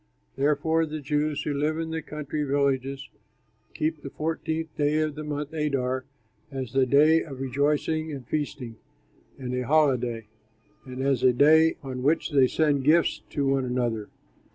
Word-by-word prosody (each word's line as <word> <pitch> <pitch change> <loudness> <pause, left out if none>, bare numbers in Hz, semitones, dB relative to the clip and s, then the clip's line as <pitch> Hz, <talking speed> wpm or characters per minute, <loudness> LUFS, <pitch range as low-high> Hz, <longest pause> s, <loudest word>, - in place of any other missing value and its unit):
Therefore 150 +3 +1
the 155 0 -5
Jews 150 +1 -1
who 150 - -2
live 150 +3 0
in 165 0 -3
the 160 0 -2
country 150 0 -4
villages 135 -1 0 0.7
keep 155 0 -1
the 140 - -7
fourteenth 160 +1 -3
day 150 +1 +1
of 155 -1 0
the 155 +1 -7
month 150 0 -4
Adar 130 -4 -1 0.4
as 130 -4 -5
a 135 -1 +3
day 155 +5 +5
of 135 -5 -8
rejoicing 145 +4 0
and 135 -5 -7
feasting 135 -6 -4 0.6
and 125 -2 -5
a 125 - -1
holiday, 125 -7 +2 0.6
and 130 +1 -5
as 135 -3 +1
a 130 -1 +5
day 160 +5 +5
on 130 -2 -5
which 155 +5 +1
they 135 -3 +5
send 145 -1 +1
gifts 160 +4 +3
to 145 - -1
one 135 -1 +1
another. 120 -4 -2
145 Hz, 160 wpm, -26 LUFS, 130-155 Hz, 0.7 s, day